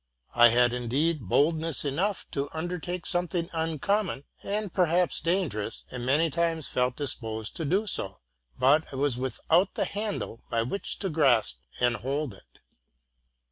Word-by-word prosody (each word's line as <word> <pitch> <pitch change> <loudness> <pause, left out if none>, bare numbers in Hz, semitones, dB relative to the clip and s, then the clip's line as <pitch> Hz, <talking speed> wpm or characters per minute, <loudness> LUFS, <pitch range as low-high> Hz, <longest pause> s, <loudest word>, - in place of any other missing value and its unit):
I 120 - +8
had 120 +1 +4
indeed 125 - 0
boldness 160 - +2
enough 180 +9 -1
to 140 0 -2
un 160 +2 -2
dertake 180 0 -4
something 175 -1 -1
uncommon 165 +1 0 0.2
and 205 -2 -3
perhaps 180 0 +2
dangerous, 165 - 0
and 125 -1 -5
many 155 +4 +3
times 165 0 0
felt 125 0 0
disposed 115 -6 -3
to 160 - -2
do 190 +9 +1
so; 100 - -3 0.4
but 150 +5 +3
I - - -7
was 135 -2 0
'Without. 165 +8 +1
the - - +1
handle 205 - -3
by 115 -1 +1
which 195 +12 -3
to 195 - -1
grasp 135 -9 +3 0.2
and 120 0 +2
hold 140 -1 -2
it. - - -20
155 Hz, 150 wpm, -28 LUFS, 125-175 Hz, 0.4 s, I